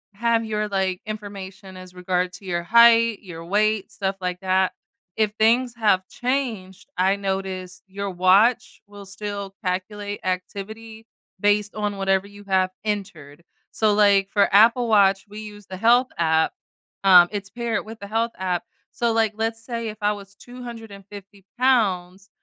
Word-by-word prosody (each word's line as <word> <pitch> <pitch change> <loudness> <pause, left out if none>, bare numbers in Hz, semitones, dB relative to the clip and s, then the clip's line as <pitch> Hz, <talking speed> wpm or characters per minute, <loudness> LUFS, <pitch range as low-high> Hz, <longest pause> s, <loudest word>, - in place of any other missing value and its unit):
have 230 +1 +1
your, 215 -1 -2
like, 190 -2 -1
information 195 -3 -8
as 185 0 -12
regard 180 0 -1
to 200 - -12
your 175 -2 -2
height, 230 +2 +5
your 165 -3 -9
weight, 210 +2 +1
stuff 195 -1 -3
like 180 -1 -4
that, 190 0 +1 0.4
if 215 -1 +1
things 240 +2 +3
have 205 -5 +2
changed, 245 -8 -3
I 190 +2 +3
noticed 190 -2 -4
your 200 +1 -5
watch 190 +7 +3
will 205 -1 -12
still 200 0 -6
calculate 205 +2 -3
activity 215 +4 -5 0.3
based 205 +1 +1
on 210 -1 -2
whatever 195 0 0
you 205 0 -14
have 190 -1 +1
entered, 185 -8 -5 0.3
so, 215 -1 +2
like, 200 -2 +4
for 200 -1 +2
Apple 230 +3 +5
Watch, 195 -2 +4
we 210 +1 -9
use 210 -2 -10
the 185 - -6
Health 240 +5 +4
app, 160 -1 +2 0.5
um, 180 -2 +8
it's 200 -1 -5
paired 235 -2 -3
with 220 +1 -10
the 200 - -7
Health 225 +2 -1
app, 180 -2 -2 0.3
so, 235 -1 0
like, 225 -1 +2
let's 225 0 -2
say 230 -2 -4
if 215 - -5
I 205 0 +2
was 200 -1 -9
250 205 -5 -11
pounds 195 -7 +1
200 Hz, 155 wpm, -23 LUFS, 190-220 Hz, 0.5 s, um